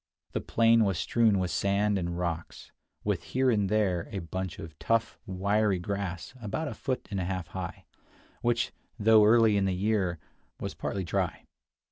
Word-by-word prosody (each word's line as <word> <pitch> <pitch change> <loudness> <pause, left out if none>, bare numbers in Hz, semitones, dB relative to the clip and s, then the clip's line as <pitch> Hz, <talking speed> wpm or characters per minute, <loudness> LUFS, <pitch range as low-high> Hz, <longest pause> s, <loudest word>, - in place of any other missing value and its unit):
The - - -2
plain 115 0 +4
was 95 -4 +1
strewn 115 -4 +3
with 90 -1 -1
sand 100 +1 +1
and 85 -1 -3
rocks, 85 -2 -4 0.3
with - - 0
here 130 0 +1
and 105 -4 +1
there 95 -5 +1
a 100 - -4
bunch 95 +1 -4
of 80 -2 -9
tough, 115 0 0
wiry 100 +2 +1
grass 95 0 -4
about 135 +9 -3
a - - -4
foot 130 -2 -3
and 100 - -1
a - - -1
half 90 -3 -3
high, - - -6 0.6
which, 120 0 +1 0.3
though 110 -1 +6
early 110 -1 +5
in 100 - +2
the 95 -1 +1
year, 95 -3 +1 0.4
was - - -4
partly 95 - -3
dry. 90 -2 -2
100 Hz, 170 wpm, -29 LUFS, 90-110 Hz, 0.6 s, though